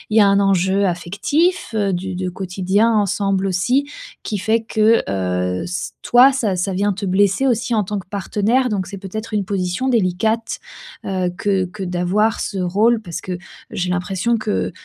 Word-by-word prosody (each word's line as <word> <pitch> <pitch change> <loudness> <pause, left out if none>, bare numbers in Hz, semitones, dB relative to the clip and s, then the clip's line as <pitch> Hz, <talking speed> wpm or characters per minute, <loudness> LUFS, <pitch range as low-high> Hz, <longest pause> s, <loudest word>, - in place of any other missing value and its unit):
y - - +7
a 200 - +6
un 200 0 +4
enjeu 195 0 +2
affectif 205 - 0
du 190 -3 -1
du 185 0 -3
quotidien 190 +4 0
ensemble 195 -1 +1
aussi, 245 +10 +1 0.3
qui 210 - -3
fait 220 +4 +1
que 220 0 +3
heu, 90 -1 -1
ç 180 +1 -4
toi, 250 +3 +6
ça 225 -8 0
ça 185 +2 -1
vient 200 +2 +1
te 200 +2 -5
blesser 200 +6 +2
aussi 240 -1 0
en 215 -2 +2
tant 205 +2 -3
que 185 - -12
partenaire, 215 +6 0
donc 200 -4 -1
c'est 200 - -7
peut-être 215 +4 -6
une 205 -2 0
position 185 +5 -2
délicate, 220 +1 0 0.5
heu, 185 -2 -1
que 195 -3 +1
que 195 +3 -10
d'avoir 185 +5 0
ce 200 - -3
rôle. 210 +6 +2
Parce 170 -6 -6
que 180 -1 -4 0.3
j'ai 180 0 -2
l'impression 185 +6 0
que 95 - -2
195 Hz, 175 wpm, -19 LUFS, 180-220 Hz, 0.5 s, y